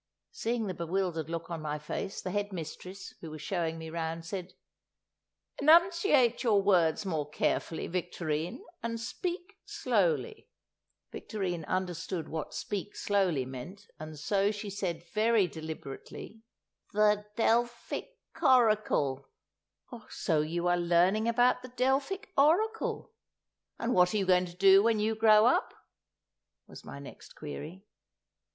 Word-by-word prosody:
Seeing 235 - -2
the 190 - -3
bewildered 170 -2 -2
look 165 0 -5
on 165 -2 -4
my 150 -1 -3
face, 150 +6 -5
the 185 - -3
head 205 +1 -2
mistress, 185 +2 -7
who 165 - -7
was 155 0 -8
showing 165 0 -2
me 160 0 -7
round, 165 0 -4
said, 185 +1 -6 1.1
"Enunciate 320 - +5
your 220 -5 +3
words 185 -3 +3
more 155 -5 -2
carefully, 160 +2 -1
Victorine, 170 - -3 0.2
and 230 0 -3
speak 355 - -5
slowly." 205 - -1 0.6
Victorine 180 -6 -4
understood 180 -1 -3
what 160 -1 -4
"speak 205 0 -4
slowly" 185 -10 +1
meant, 135 +11 -9
and 155 0 -8
so 195 +7 +1
she 205 -1 -5
said 180 -4 -3
very 220 -1 +3
deliberately, 160 +6 -8 0.5
"The—Delphic—Horricul." 220 - +1 0.8
"So 160 -5 0
you 170 +3 -2
are 175 0 +3
learning 175 +5 +3
about 245 +2 +3
the 255 - -9
Delphic 270 +11 0
Oracle. 430 +12 +2 0.7
And 235 +1 -1
what 180 +2 +4
are - - +3
you 195 - +1
going 180 -1 +3
to 175 0 -13
do 195 +1 +7
when 225 0 +2
you 215 +1 +1
grow 215 -1 +6
up?" 350 - +2 0.9
was - - -12
my - - -9
next 140 -1 -12
query. 155 +6 -8
195 Hz, 130 wpm, -30 LUFS, 165-230 Hz, 1.1 s, do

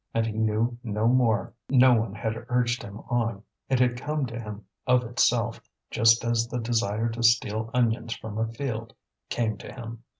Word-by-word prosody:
And 115 0 +2
he 110 - -3
knew 110 +2 0
no 110 -1 0
more; 120 -4 +2 0.2
no 130 -1 +6
one 115 -3 0
had 110 +1 -2 0.2
urged 125 +1 +1
him 105 -2 -9
on, 115 -5 -1 0.3
it 130 -2 +2
had 125 -1 +2
come 150 -1 -1
to 115 -1 -6
him 105 -2 -8 0.2
of 125 0 +4
itself, 115 -1 +1 0.3
just 115 +1 +4
as 115 0 +1
the 125 - -4
desire 115 -1 0
to 115 +1 -5
steal 110 -1 +2
onions 115 -1 0
from 110 -1 -6
a 115 - +1
field 115 -2 -5 0.3
came 110 -3 -1
to - - -9
him. 115 -2 -8
115 Hz, 180 wpm, -26 LUFS, 110-120 Hz, 0.3 s, no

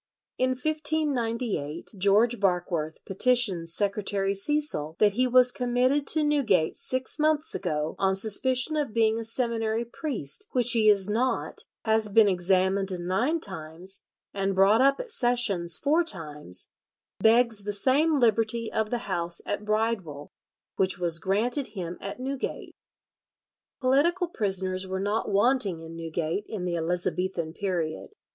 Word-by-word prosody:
In 255 - +2
1598 250 - -1
George 205 +5 +3
Barkworth 175 -5 -1
petitions 195 -5 +2
Secretary 200 -1 0
Cecil 200 - 0
"that 210 -1 +4
he 250 +5 +1
was 250 0 +5
committed 255 +3 0
to 310 -1 +3
Newgate 255 - +2
six 255 +2 -3
months 305 0 +1
ago 150 +1 -2
on 190 0 +2
suspicion 255 +8 +1
of 285 -7 -2
being 225 0 +2
a - - -4
seminary 230 -1 -1
priest, 235 - -5
which 245 -1 +2
he 220 -2 +4
is 200 -2 +3
not; 235 +5 -1 0.2
has 220 -1 +1
been 220 0 +6
examined 190 +1 +1
nine 225 - 0
times, 185 - -4 0.3
and 195 -1 -1
brought 200 +5 +5
up 275 +1 +3
at - - -6
Sessions 210 - +2
four 315 +5 +2
times; 150 - -3 0.5
begs 225 -2 +3
the 205 - -3
same 275 +9 +2
liberty 230 -1 +1
of 220 -1 0
the 240 0 -3
house 175 -3 -2
at 205 +1 -4
Bridewell 210 -9 -2 0.5
which 190 0 +1
was 170 -2 +2
granted 230 - 0
him 175 -1 -5
at 200 +5 -6
Newgate." 265 +1 -5 1.1
Political 325 +8 +2
prisoners 190 - -2
were 190 0 -3
not 205 +3 -1
wanting 205 -4 +1
in 165 0 -10
Newgate 165 +3 -3
in 200 -5 -5
the 175 -1 -1
Elizabethan 175 0 -2
period. 180 - -3
210 Hz, 140 wpm, -26 LUFS, 185-250 Hz, 1.1 s, been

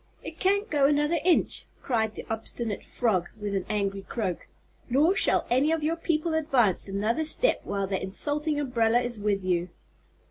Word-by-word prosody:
"It - - -9
can't 400 +2 +2
go 290 -7 +3
another 295 +3 +1
inch," 350 -1 +3 0.2
cried 220 -4 0
the - - -7
obstinate 225 -1 -3
frog, 200 -8 -1
with 205 -1 -4
an 195 -2 -2
angry 200 -2 -1
croak, 190 -4 -4 0.4
"nor 300 +9 +3
shall - - +1
any 270 +6 +3
of 325 -2 -1
your 320 +2 +1
people 330 -1 -1
advance 265 - +1
another 215 +9 -1
step 410 +10 +3
while 200 -1 -2
that 190 -1 -2
insulting 290 +10 0
umbrella 240 -4 +2
is 240 -3 -4
with 200 -2 -1
you." 180 -1 0
240 Hz, 170 wpm, -27 LUFS, 200-305 Hz, 0.4 s, go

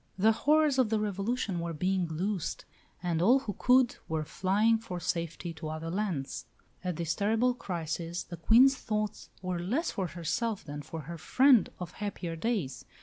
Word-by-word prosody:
The 215 +4 +5
horrors 295 +4 +3
of 250 -4 +4
the 220 -1 +1
Revolution 205 -1 -1
were 170 0 -3
being 185 +2 0
loosed, 180 +3 -3 0.4
and 170 -2 0
all 235 +9 +6
who 210 -7 -5
could 255 -1 +4
were 160 -1 -1
flying 205 +8 +2
for 195 -6 -6
safety 170 0 -3
to 160 0 -7
other 160 +1 -4
lands. 180 - -2 0.4
At 180 -2 -2
this 165 0 -1
terrible 225 +5 +2
crisis 170 -4 -4
the 175 - -8
Queen's 245 - +6
thoughts 215 -4 -3
were 180 -1 -2
less 240 - -1
for 190 -4 -2
herself 175 +7 -2
than 145 -1 -6
for 160 +2 -7
her 165 +3 -8
friend 260 - +5
of 180 -1 -5
happier 195 -5 -4
days. 180 - -2
185 Hz, 170 wpm, -30 LUFS, 165-225 Hz, 0.4 s, all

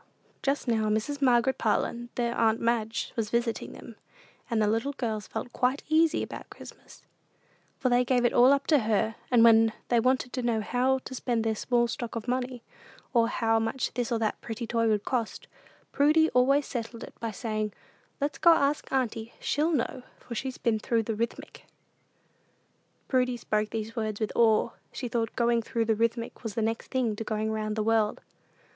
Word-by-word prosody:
Just 275 -1 -1
now 220 -2 +1
Mrs. 220 +7 -1
Margaret 250 0 +3
Parlin, 235 +2 0
their 235 -1 -1
"aunt 225 0 +2
Madge," 230 -1 -1
was 220 -2 -1
visiting 235 -2 -1
them, 230 - -12 0.5
and 230 -2 +1
the 215 - +3
little 225 +7 0
girls 220 -6 -3
felt 245 - -6
quite 260 +3 0
easy 320 +1 +3
about - - -8
Christmas, - - -13 0.7
for 255 - 0
they 245 0 +4
gave 245 -1 +2
it 240 - +2
all 250 +2 +6
up 280 -1 +2
to 300 -3 +4
her; 220 -1 +1 0.2
and 240 -2 +5
when 225 -1 +6 0.2
they 240 - +4
wanted 255 +1 +1
to 255 - -2
know 235 -2 +1
how 250 +4 +1
to - - -7
spend 240 -3 -1
their 225 -1 +1
small 240 +2 +1
stock 235 0 -5
of 230 +1 -5
money, 250 -1 -2 0.5
or 230 -2 +4
how 225 -1 +1
much 225 +4 -2
this 245 -1 -2
or 235 - +2
that 220 -1 -2
pretty 230 +1 -5
toy 230 0 +1
would 210 -2 +1
cost, 240 -4 -2 0.5
Prudy 310 +3 +4
always 270 +3 +3
settled 230 -2 -5
it - - -10
by 230 - -3
saying, 215 0 -3 0.5
"Let's 285 0 -2
go 340 - +7
ask 290 -1 0
auntie: 230 -3 -1
she'll 305 +4 0
know, 260 -3 -1 0.2
for 240 - -9
she's 260 +3 -4
been 225 -2 0
through 225 +1 0
the 225 - -2
Rithmetic." 230 +2 -5 1.4
Prudy 250 -2 +1
spoke 215 -2 -1
these 225 +1 -5
words 215 -3 -2
with 215 -2 -1
awe. 225 0 +4 0.2
She 250 - -5
thought 230 -2 -2
"going 235 -1 +2
through 230 0 -1
the 225 0 +2
Rithmetic" 230 +1 -1
was 225 -3 -6
next 225 0 -1
thing 245 -5 0
to 225 - -3
going 220 0 -2
round 215 -1 -2
the 215 - 0
world. 220 -1 +1
235 Hz, 190 wpm, -28 LUFS, 220-255 Hz, 1.4 s, go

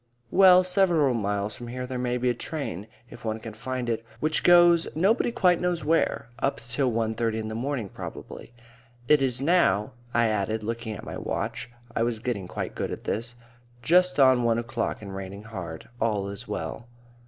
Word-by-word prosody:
"Well, 185 -1 +7
several 180 -7 +3
miles 105 -1 -1
from 120 - -8
here 125 +1 -5
there 125 0 -4
may 125 0 0
be 125 0 +1
a - - -1
tram, 115 - -5 0.2
if - - -12
one 110 -1 -2
can 110 -1 -8
find 125 +2 -4
it, 115 -1 -1 0.2
which 155 +2 0
goes 175 -1 +6
nobody 200 +8 +2
quite 185 -7 +3
knows 180 -2 -1
where 160 -6 +1
up 135 - 0
till 120 +3 -1
one 110 -1 0
thirty 115 -1 -1
in 110 -1 -4
the - - -5
morning 125 -1 -2
probably. 100 - -9 0.6
It 150 0 +5
is 130 -1 +2
now," 135 - +3 0.2
I 120 0 +3
added, 110 0 -1
looking 115 0 -4
at - - -9
my - - -6
watch - - -3 0.3
(I - - 0
was 115 -1 0
getting 110 -5 -3
quite - - -5
good - - -3
at - - -6
this), 115 +3 -3 0.5
"just 180 +4 +3
on 130 -2 +6
one 115 -1 +2
o'clock 120 -2 -3
and 100 -1 -7
raining 95 +1 -7
hard. 90 -7 -7
All 105 -3 0
is 100 0 -6
well." 120 - -5
120 Hz, 190 wpm, -26 LUFS, 110-150 Hz, 0.6 s, Well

